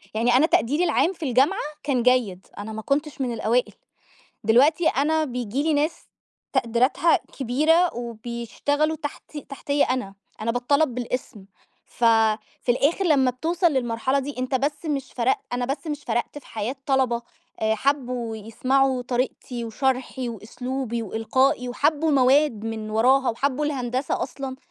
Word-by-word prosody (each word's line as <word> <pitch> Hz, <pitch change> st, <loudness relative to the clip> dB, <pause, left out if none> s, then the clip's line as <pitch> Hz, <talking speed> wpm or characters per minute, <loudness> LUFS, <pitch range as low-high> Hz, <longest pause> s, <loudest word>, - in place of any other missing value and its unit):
يعني 240 Hz, +2 st, +2 dB
أنا 305 Hz, -, +5 dB
تقديري 295 Hz, +3 st, +2 dB
العام 355 Hz, +1 st, +2 dB
في 325 Hz, -, -10 dB
الجامعة 260 Hz, +2 st, +3 dB, 0.2 s
كان 260 Hz, -5 st, 0 dB
جيد، 235 Hz, -8 st, +1 dB
أنا 210 Hz, +2 st, -6 dB
ما 220 Hz, -, -5 dB
كنتش 285 Hz, +2 st, -1 dB
من 245 Hz, -2 st, -1 dB
الأوائل. 230 Hz, +2 st, 0 dB, 0.7 s
دلوقتي 290 Hz, +9 st, +4 dB
أنا 310 Hz, +4 st, +2 dB
بييجي 250 Hz, 0 st, -3 dB
لي 315 Hz, 0 st, +1 dB
ناس 305 Hz, +3 st, -1 dB, 0.5 s
تقديراتها 250 Hz, +8 st, +3 dB, 0.2 s
كبيرة 310 Hz, +8 st, +3 dB
وبيشتغلوا 240 Hz, +6 st, -2 dB
تحت 295 Hz, +1 st, -8 dB
تحتيّا 285 Hz, 0 st, -1 dB
أنا، 250 Hz, -7 st, -2 dB, 0.3 s
أنا 225 Hz, +2 st, 0 dB
باتطلب 260 Hz, +3 st, +1 dB
بالاسم. 245 Hz, -3 st, -4 dB, 0.4 s
ف -, -, -23 dB, 0.6 s
في -, -, -24 dB
الآخر 295 Hz, +10 st, +1 dB
لمّا 275 Hz, -7 st, +4 dB
بتوصل 330 Hz, +8 st, 0 dB
للمرحلة 260 Hz, +1 st, 0 dB
دي 275 Hz, +1 st, -4 dB
أنت 255 Hz, +1 st, -2 dB
بس 290 Hz, +4 st, -1 dB
مش 275 Hz, -3 st, -3 dB
فرق 250 Hz, +2 st, +2 dB, 0.2 s
أنا 245 Hz, 0 st, -1 dB
بس 275 Hz, +3 st, -4 dB
مش 295 Hz, -2 st, -4 dB
فرقت 240 Hz, +4 st, -2 dB
في -, -, -17 dB
حياة 225 Hz, +5 st, -4 dB
طلبة 260 Hz, -4 st, +1 dB, 0.4 s
آآ، 220 Hz, 0 st, +2 dB
حبّوا 250 Hz, -3 st, -1 dB
يسمعوا 255 Hz, +4 st, +1 dB
طريقتي 245 Hz, -1 st, -3 dB
وشرحي 255 Hz, +2 st, -1 dB
وأسلوبي 235 Hz, +2 st, -4 dB
وإلقائي 250 Hz, +5 st, +1 dB
وحبّوا 295 Hz, +5 st, +1 dB
مواد 265 Hz, -4 st, +3 dB
من 220 Hz, -1 st, -4 dB
وراها 255 Hz, +5 st, +3 dB
وحبّوا 275 Hz, +5 st, -1 dB
الهندسة 260 Hz, -2 st, -1 dB
أصلًا. 260 Hz, 0 st, -5 dB
260 Hz, 145 wpm, -24 LUFS, 235-285 Hz, 0.7 s, أنا